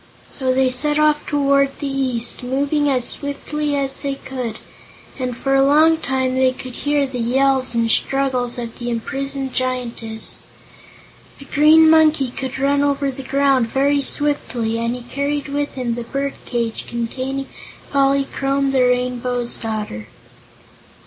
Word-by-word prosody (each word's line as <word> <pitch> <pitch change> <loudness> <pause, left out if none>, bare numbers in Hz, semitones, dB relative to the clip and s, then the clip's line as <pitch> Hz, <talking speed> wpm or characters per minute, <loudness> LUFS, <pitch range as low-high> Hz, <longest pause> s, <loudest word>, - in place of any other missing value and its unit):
So 260 -2 0
they 260 0 +2
set 295 +4 +2
off 305 0 +3
toward 275 -1 +2
the - - -5
east, 265 -4 -1
moving 285 +3 0
as 255 -3 +1
swiftly 290 +1 -3
as 275 -1 +2
they 275 -1 -3
could, 255 -4 -5 0.6
and 250 -2 -3
for 270 +2 -1
a 270 0 +5
long 310 +4 +5
time 265 -4 -1
they 260 0 +2
could 255 0 -8
hear 290 +1 0
the 260 -2 -5
yells 260 +1 +3
and 230 0 +2
struggles 255 0 0
of 235 -1 -6
the 240 0 -3
imprisoned 270 +3 -3
Giantess. 240 -3 -3 1.0
The 275 - -12
Green 310 +3 +6
Monkey 315 -4 +4
could 265 +1 -5
run 280 +1 +2
over 280 -1 +1
the 270 +1 -8
ground 270 -2 +2
very 280 +3 +1
swiftly, 250 -6 -1
and 235 +1 -1
he 250 - -8
carried 280 +3 -3
with 285 +1 -2
him 250 -3 -2
the 240 - -4
bird 275 +3 -3
cage 235 -2 -2
containing 260 +3 -3 0.5
Polychrome 275 0 +1
the 265 -1 +2
Rain 250 0 +1
bow's 245 -1 -2
Daughter. 210 - -5
270 Hz, 150 wpm, -20 LUFS, 250-280 Hz, 1.0 s, Green